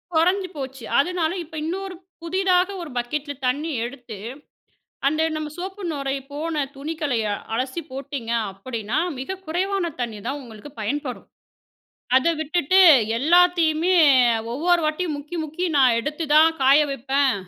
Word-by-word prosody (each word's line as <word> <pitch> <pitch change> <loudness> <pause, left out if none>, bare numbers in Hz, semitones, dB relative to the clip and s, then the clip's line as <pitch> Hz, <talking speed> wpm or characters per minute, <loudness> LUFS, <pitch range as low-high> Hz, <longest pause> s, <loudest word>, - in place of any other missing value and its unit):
கொறஞ்சு 370 +4 +3
போச்சு. 265 -3 -6 0.2
அதனால 335 +2 +1
இப்ப 320 - -13
இன்னொரு 380 +2 -4 0.3
புதிதாக 370 +1 +2
ஒரு 330 - -7
பக்கெட்ல 285 +4 -3
தண்ணி 295 +6 -1
எடுத்து, 240 -3 -7 0.9
அந்த 310 +3 +2
நம்ம 310 -1 -3
சோப்பு 385 +3 -6
நுரை 275 -1 -2 0.2
போன 315 +3 -3 0.2
துணிகளை 295 -3 -2 0.4
அலசி 260 +7 -2
போட்டீங்க 270 -3 -5 0.2
அப்டின்னா 220 +5 -4 0.2
மிக 375 +9 -5
குறைவான 370 +3 -1
தண்ணி 230 -3 -3
தான் 280 +2 -3
உங்களுக்கு 225 +3 -11
பயன்படும். 255 +4 -3 0.9
அத 260 +5 +4
விட்டுட்டு 320 +3 +2 0.4
எல்லாத்தையுமே, 345 +2 +4 0.6
ஒவ்வொரு 345 +7 +2
வாட்டியும் 310 +1 -1
முக்கி, 295 +4 -7
முக்கி 315 +4 -4
நான் 255 -4 +5
எடுத்து 300 +6 -3
தான் 315 +1 +7
காய 270 +2 +6
வெப்பேன், 270 0 +1
300 Hz, 125 wpm, -23 LUFS, 265-345 Hz, 0.9 s, தான்